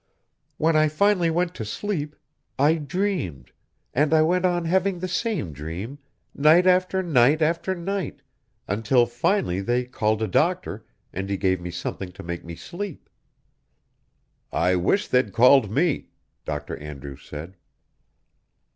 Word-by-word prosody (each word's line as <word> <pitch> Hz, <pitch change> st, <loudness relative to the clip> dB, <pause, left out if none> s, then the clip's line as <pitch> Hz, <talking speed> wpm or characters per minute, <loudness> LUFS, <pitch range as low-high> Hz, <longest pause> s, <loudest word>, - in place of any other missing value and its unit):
When 160 Hz, +1 st, +2 dB
I 155 Hz, 0 st, +5 dB
finally 175 Hz, +2 st, +2 dB
went 175 Hz, +2 st, 0 dB
to 115 Hz, -, -5 dB
sleep, 150 Hz, -, -3 dB, 0.4 s
I 145 Hz, +4 st, +4 dB
dreamed, 155 Hz, -, -3 dB, 0.4 s
and 150 Hz, +4 st, +3 dB
I 155 Hz, -, +5 dB
went 180 Hz, +3 st, +2 dB
on 175 Hz, -2 st, +1 dB
having 190 Hz, +2 st, +1 dB
the 185 Hz, +1 st, -4 dB
same 180 Hz, -, -2 dB
dream, 85 Hz, -, -6 dB, 0.3 s
night 155 Hz, +5 st, +5 dB
after 185 Hz, +1 st, +3 dB
night 145 Hz, -2 st, +4 dB
after 170 Hz, +4 st, 0 dB
night, 185 Hz, -1 st, -4 dB, 0.4 s
until 115 Hz, +5 st, +2 dB
finally 120 Hz, -, 0 dB
they 120 Hz, +4 st, 0 dB
called 110 Hz, -3 st, 0 dB
a -, -, 0 dB
doctor 170 Hz, -, 0 dB, 0.3 s
and 95 Hz, +1 st, -4 dB
he 100 Hz, -, -1 dB
gave 95 Hz, -2 st, +1 dB
me 90 Hz, -, -5 dB
something 90 Hz, +2 st, -5 dB
to -, -, -10 dB
make 85 Hz, 0 st, -5 dB
me 85 Hz, 0 st, -8 dB
sleep." 180 Hz, -, -7 dB, 1.4 s
"I 90 Hz, +1 st, +2 dB
wish 145 Hz, -, +1 dB
they'd 125 Hz, -6 st, +1 dB
called 125 Hz, 0 st, +6 dB
me," 145 Hz, -, 0 dB, 0.4 s
Dr. 75 Hz, -1 st, -4 dB
Andrews 70 Hz, -2 st, -9 dB
said. 80 Hz, +6 st, -9 dB
145 Hz, 140 wpm, -24 LUFS, -, 1.4 s, called